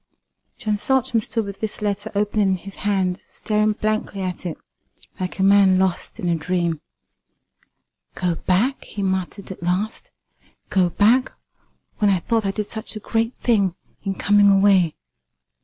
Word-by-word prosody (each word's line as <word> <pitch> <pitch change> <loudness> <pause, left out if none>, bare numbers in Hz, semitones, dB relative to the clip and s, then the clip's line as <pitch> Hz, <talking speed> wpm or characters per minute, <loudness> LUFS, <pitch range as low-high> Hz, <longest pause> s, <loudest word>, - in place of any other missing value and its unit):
John 215 -1 -1
Saltram 250 0 +1
stood 225 0 -1
with 200 -1 -7
this 220 -1 -4
letter 205 0 -2
open 210 +1 0
in 195 -2 +3
his 195 +2 -9
hand, 190 -2 0
staring 215 0 0
blankly 215 -2 -2
at 185 -1 -4
it, 165 - -5 0.6
like 185 -1 -4
a 190 - +1
man 195 -1 +6
lost 190 +3 -1
in 185 - -2
a 170 - +2
dream. 170 -1 -1 1.3
"Go 180 -1 0
back!" 200 +11 0
he 205 - -5
muttered 190 +1 -2
at 190 - -9
last 185 +6 -2 0.6
"go 185 -2 +3
back, 235 +8 +3 0.7
when 210 -2 +4
I 195 - +4
thought 225 +2 0
I - - +1
did 210 +1 -3
such 220 +1 -5
a - - -4
great 225 +3 -1
thing 200 -7 +2 0.3
in 195 -1 -3
coming 205 0 +4
away! 195 -4 +4
200 Hz, 155 wpm, -22 LUFS, 185-215 Hz, 1.3 s, man